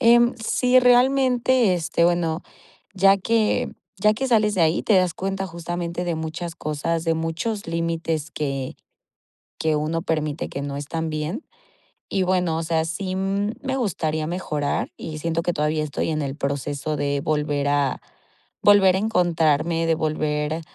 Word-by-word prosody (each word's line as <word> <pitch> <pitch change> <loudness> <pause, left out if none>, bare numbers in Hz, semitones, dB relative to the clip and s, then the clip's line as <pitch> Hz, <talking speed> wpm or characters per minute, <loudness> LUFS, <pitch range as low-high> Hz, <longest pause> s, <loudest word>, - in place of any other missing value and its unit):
Em, 240 0 +5
sí, 250 +3 +3
realmente, 250 -3 +4
este, 170 0 0
bueno, 170 -2 +1 0.5
ya 195 +1 +5
que 220 +2 +1 0.3
ya 210 +2 +4
que 265 +5 -2
sales 215 -3 +3
de 175 - +2
ahí, 160 +1 +2
te 215 - +3
das 185 -2 +3
cuenta, 195 +1 -3
justamente, 170 0 -4
de 170 -2 -1
muchas 160 +2 -5
cosas, 155 +2 -2
de 165 - +2
muchos 165 +6 -3
límites 165 -2 -2
que 135 -3 -3 0.8
que 155 -1 +1
uno 160 +2 -1
permite 155 -2 -2
que 140 - -5
no 140 0 -4
están 160 +3 -3
bien. 155 - -4 0.7
Y 195 - +1
bueno, 180 -3 +1
o - - -2
sea, 160 0 0
sí, 185 +3 -3
mm, 195 +2 -1
me 265 -1 -2
gustaría 160 -9 -1
mejorar, 155 -5 -2
y 155 -1 -6
siento 165 +1 -1
que 175 - 0
todavía 155 +1 0
estoy 150 +2 -2
en 155 -1 -1
el 140 0 -4
proceso 145 +1 -2
de 140 0 -1
volver 150 -2 0
a 145 -2 +1 0.6
volver 195 -2 +6
a - - +1
encontrarme, 165 -5 +1
de 165 - +3
volver 155 0 -1
165 Hz, 160 wpm, -23 LUFS, 155-195 Hz, 0.8 s, volver